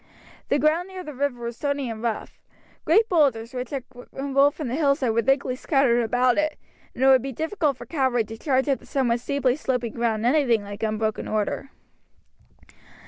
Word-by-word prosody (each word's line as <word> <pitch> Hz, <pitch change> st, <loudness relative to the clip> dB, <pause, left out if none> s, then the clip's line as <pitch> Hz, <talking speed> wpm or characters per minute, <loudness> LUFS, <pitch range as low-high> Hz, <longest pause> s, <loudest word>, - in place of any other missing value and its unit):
The 280 Hz, -, +3 dB
ground 310 Hz, +5 st, +2 dB
near 375 Hz, -1 st, -8 dB
the 300 Hz, -, -8 dB
river 260 Hz, -3 st, -2 dB
was 235 Hz, 0 st, -5 dB
stony 285 Hz, -2 st, -2 dB
and 225 Hz, -2 st, -6 dB
rough. 230 Hz, -2 st, -4 dB, 0.4 s
Great 425 Hz, +8 st, +4 dB
boulders, 265 Hz, -, +1 dB
which 250 Hz, -1 st, -4 dB
had 275 Hz, -3 st, -4 dB, 0.3 s
rolled 275 Hz, +1 st, +2 dB
from 300 Hz, -, -4 dB
the 240 Hz, -, -3 dB
hillside, 280 Hz, -4 st, +2 dB
were 230 Hz, +1 st, +2 dB
thickly 270 Hz, 0 st, +1 dB
scattered 260 Hz, -3 st, +2 dB
about 245 Hz, +3 st, +2 dB
it, 305 Hz, 0 st, -1 dB, 0.4 s
and 255 Hz, -, -2 dB
it -, -, +6 dB
would 260 Hz, -1 st, +6 dB
be 270 Hz, -, -4 dB
difficult 315 Hz, -, -1 dB
for -, -, -9 dB
cavalry 260 Hz, -6 st, +1 dB
to 225 Hz, +1 st, -9 dB
charge 265 Hz, -1 st, +1 dB
up 275 Hz, -2 st, +1 dB
the -, -, -18 dB
somewhat 245 Hz, -4 st, +1 dB
steeply 260 Hz, 0 st, 0 dB
sloping 250 Hz, -6 st, -2 dB
ground 230 Hz, -2 st, -1 dB
in 245 Hz, -, +4 dB
anything 245 Hz, -8 st, +2 dB
like 205 Hz, 0 st, -8 dB
unbroken 215 Hz, 0 st, -1 dB
order. 215 Hz, +5 st, -2 dB
260 Hz, 195 wpm, -24 LUFS, 235-285 Hz, 0.4 s, it